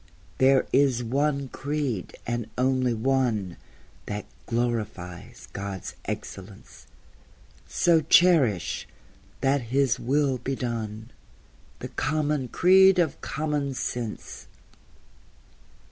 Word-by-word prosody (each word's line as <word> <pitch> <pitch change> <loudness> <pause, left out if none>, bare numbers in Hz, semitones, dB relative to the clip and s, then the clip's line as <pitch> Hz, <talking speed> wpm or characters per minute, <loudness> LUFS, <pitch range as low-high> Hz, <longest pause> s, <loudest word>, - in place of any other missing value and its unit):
There 135 0 +5
is 130 -3 +3
one 140 +3 0
creed, 140 -9 -3
and 120 -1 -2
only 130 0 +2
one, 115 -6 0 0.5
That 105 0 -4 0.2
glorifies 110 -7 -3
God's 100 -1 -5
excellence; 95 +1 -8 0.8
So 165 -2 +3
cherish, 150 - +3 0.5
that 135 +1 +2
His 135 -1 +2
will 135 0 +1
be 135 +2 -3
done, 115 -2 -4 0.7
The - - -5
common 145 -2 -1
creed 190 +6 +6
of 165 -5 +1
common 145 -2 -2
sense. 120 -3 -5
130 Hz, 90 wpm, -26 LUFS, 115-145 Hz, 0.8 s, creed